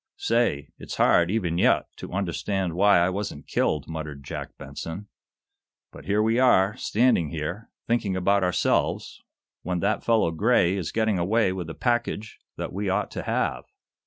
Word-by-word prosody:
"Say, 115 Hz, -11 st, 0 dB
it's -, -, -7 dB
hard, 85 Hz, 0 st, +4 dB
even 90 Hz, -5 st, 0 dB
yet, -, -, +3 dB
to -, -, -8 dB
understand 95 Hz, 0 st, -2 dB
why 100 Hz, +3 st, +5 dB
I 85 Hz, +1 st, +3 dB
wasn't 95 Hz, -6 st, -5 dB
killed," 75 Hz, -2 st, 0 dB
muttered 75 Hz, -3 st, -6 dB
Jack -, -, -7 dB
Benson. 80 Hz, +8 st, -7 dB, 0.9 s
"But -, -, -13 dB
here 105 Hz, +2 st, +2 dB
we 115 Hz, +2 st, +2 dB
are, 105 Hz, -5 st, +4 dB
standing 115 Hz, -10 st, +2 dB
here, 85 Hz, +7 st, -5 dB, 0.2 s
thinking 115 Hz, -5 st, 0 dB
about 100 Hz, +2 st, +2 dB
ourselves, 90 Hz, -1 st, 0 dB, 0.4 s
when 90 Hz, +1 st, -2 dB
that -, -, 0 dB
fellow, 110 Hz, -7 st, +2 dB
Gray, 95 Hz, 0 st, +2 dB
is 95 Hz, -4 st, -3 dB
getting 110 Hz, -4 st, +1 dB
away 95 Hz, +2 st, +2 dB
with 90 Hz, -3 st, -5 dB
a 80 Hz, -, -7 dB
package 120 Hz, -3 st, -2 dB, 0.2 s
that -, -, -5 dB
we 100 Hz, +1 st, -2 dB
ought 95 Hz, +2 st, -1 dB
to -, -, -4 dB
have. -, -, -1 dB
95 Hz, 160 wpm, -25 LUFS, 85-110 Hz, 0.9 s, why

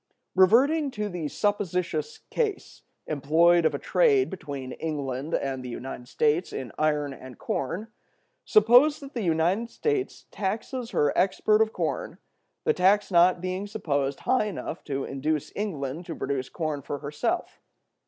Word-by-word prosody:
Reverting 265 Hz, -, +4 dB
to 210 Hz, 0 st, -1 dB
the 175 Hz, -5 st, -3 dB
supposititious 180 Hz, -5 st, -1 dB
case 440 Hz, -5 st, -2 dB, 0.2 s
employed 160 Hz, +4 st, +3 dB
of 155 Hz, -2 st, +2 dB
a -, -, 0 dB
trade 415 Hz, -, +3 dB
between 140 Hz, -8 st, -6 dB
England 145 Hz, -1 st, -3 dB
and 135 Hz, -2 st, -2 dB
the 125 Hz, -, -6 dB
United 125 Hz, 0 st, -7 dB
States 155 Hz, +6 st, +1 dB
in 125 Hz, -4 st, -5 dB
iron 150 Hz, -2 st, +1 dB
and 130 Hz, -2 st, -11 dB
corn, 175 Hz, -, -3 dB, 0.6 s
suppose 245 Hz, +8 st, +5 dB
that 280 Hz, -1 st, -10 dB
the 235 Hz, -, -2 dB
United 180 Hz, +6 st, +1 dB
States 425 Hz, -, -2 dB
taxes 230 Hz, +5 st, -3 dB
her 145 Hz, -1 st, +1 dB
export 210 Hz, +3 st, +3 dB
of 220 Hz, 0 st, +2 dB
corn, -, -, -3 dB, 0.5 s
the -, -, +3 dB
tax 195 Hz, +3 st, +3 dB
not 175 Hz, 0 st, +5 dB
being 185 Hz, +2 st, -3 dB
supposed 140 Hz, -9 st, -2 dB
high 255 Hz, -4 st, +2 dB
enough 210 Hz, -, -5 dB
to 135 Hz, -2 st, -2 dB
induce 150 Hz, +2 st, -2 dB
England 165 Hz, -5 st, -4 dB
to 165 Hz, -, -5 dB
produce 135 Hz, -1 st, -3 dB
corn 155 Hz, -4 st, -3 dB
for 140 Hz, +1 st, -4 dB
herself. 145 Hz, +2 st, -3 dB
170 Hz, 145 wpm, -26 LUFS, 145-210 Hz, 0.6 s, suppose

